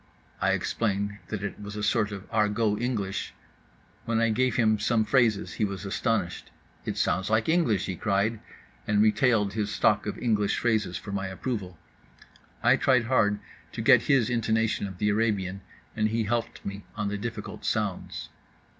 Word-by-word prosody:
I -, -, +3 dB
explained 100 Hz, -2 st, -1 dB
that 105 Hz, -2 st, -4 dB
it 105 Hz, -, -5 dB
was 100 Hz, 0 st, -7 dB
a 105 Hz, -, -4 dB
sort 105 Hz, 0 st, +1 dB
of 100 Hz, -1 st, -7 dB
Argot 105 Hz, 0 st, +1 dB
English. 105 Hz, -6 st, -2 dB, 0.7 s
When 115 Hz, -1 st, +1 dB
I 115 Hz, 0 st, +3 dB
gave 125 Hz, +1 st, +1 dB
him 110 Hz, -2 st, +3 dB
some 110 Hz, 0 st, +2 dB
phrases 115 Hz, -5 st, +2 dB
he 110 Hz, -, -2 dB
was 100 Hz, -1 st, -3 dB
astonished—"It 100 Hz, -2 st, -3 dB
sounds 95 Hz, +2 st, +1 dB
like 110 Hz, 0 st, +2 dB
English!" 160 Hz, -, +2 dB
he 95 Hz, -, -3 dB
cried, 105 Hz, +3 st, 0 dB, 0.5 s
and 105 Hz, -1 st, +2 dB
retailed 110 Hz, -2 st, +3 dB
his 105 Hz, -1 st, -1 dB
stock 105 Hz, 0 st, +2 dB
of 105 Hz, -, -3 dB
English 105 Hz, -4 st, +1 dB
phrases 110 Hz, -6 st, 0 dB
for 100 Hz, +2 st, -8 dB
my 100 Hz, -1 st, -2 dB
approval. 95 Hz, -3 st, -4 dB, 0.9 s
I -, -, +5 dB
tried 125 Hz, -3 st, +3 dB
hard 110 Hz, -4 st, +2 dB, 0.4 s
to -, -, -4 dB
get -, -, +7 dB
his 130 Hz, -5 st, +3 dB
intonation 110 Hz, -3 st, +1 dB
of 95 Hz, -2 st, -9 dB
the 105 Hz, +3 st, +1 dB
Arabian, 100 Hz, -3 st, 0 dB, 0.3 s
and 110 Hz, -1 st, +1 dB
he 115 Hz, +1 st, 0 dB
helped 115 Hz, +2 st, -2 dB
me 100 Hz, 0 st, -5 dB
on 105 Hz, -2 st, -1 dB
the 105 Hz, -, -2 dB
difficult 115 Hz, +2 st, -6 dB
sounds. -, -, -2 dB
105 Hz, 165 wpm, -27 LUFS, 100-115 Hz, 0.9 s, get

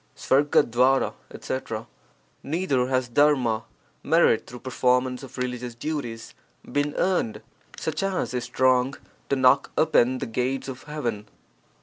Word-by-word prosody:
■M'l&K 130 Hz, -2 st, +3 dB, 0.2 s
etc. 115 Hz, -4 st, -5 dB, 0.3 s
— -, -, -38 dB, 0.2 s
Neither 140 Hz, -6 st, 0 dB
has 130 Hz, -1 st, 0 dB
dharma 125 Hz, -4 st, +2 dB, 0.4 s
(merit -, -, +3 dB
through 125 Hz, 0 st, -10 dB
performance 125 Hz, 0 st, +1 dB
of 135 Hz, -1 st, -11 dB
religious 125 Hz, -1 st, -4 dB
duties) 120 Hz, -4 st, -5 dB, 0.4 s
been 145 Hz, +1 st, 0 dB
earned, 180 Hz, -, 0 dB, 0.3 s
such 155 Hz, -1 st, -3 dB
as 195 Hz, -9 st, -1 dB
is 125 Hz, -1 st, -2 dB
strong 130 Hz, +1 st, +2 dB, 0.3 s
to 140 Hz, -, +2 dB
knock 130 Hz, +1 st, +4 dB
open 130 Hz, -5 st, +3 dB
the -, -, -4 dB
gates 125 Hz, +3 st, -2 dB
of 130 Hz, -1 st, -7 dB
heaven. 120 Hz, -9 st, -4 dB
130 Hz, 125 wpm, -25 LUFS, 125-145 Hz, 0.4 s, knock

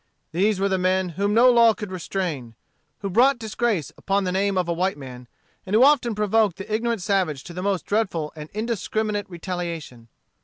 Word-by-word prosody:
These 195 Hz, +4 st, +1 dB
were 195 Hz, -, +2 dB
the 190 Hz, -1 st, 0 dB
men 185 Hz, 0 st, +1 dB
whom 200 Hz, +5 st, -1 dB
no 250 Hz, +2 st, +7 dB
law 230 Hz, -2 st, +5 dB
could 210 Hz, -3 st, -7 dB
restrain; 165 Hz, -10 st, -4 dB, 0.5 s
who 200 Hz, -, -3 dB
brought 255 Hz, +7 st, +4 dB
disgrace 220 Hz, -, -2 dB
upon 195 Hz, +1 st, 0 dB
the 180 Hz, -, -1 dB
name 195 Hz, +1 st, 0 dB
of 180 Hz, -2 st, 0 dB
a 170 Hz, -, 0 dB
white 185 Hz, 0 st, -1 dB
man, 125 Hz, -3 st, -10 dB, 0.4 s
and 195 Hz, +2 st, -2 dB
who 230 Hz, -, +6 dB
often 260 Hz, -5 st, +4 dB
provoked 210 Hz, -2 st, +2 dB
the 195 Hz, +2 st, -6 dB
ignorant 230 Hz, -2 st, -1 dB
savage 180 Hz, -9 st, 0 dB
to 175 Hz, -, -10 dB
the 180 Hz, -, -5 dB
most 195 Hz, -1 st, -1 dB
dreadful 190 Hz, -8 st, -1 dB
and 150 Hz, 0 st, -9 dB
indiscriminate 215 Hz, -1 st, -2 dB
retaliation. 170 Hz, -9 st, -6 dB
195 Hz, 190 wpm, -23 LUFS, 175-215 Hz, 0.5 s, no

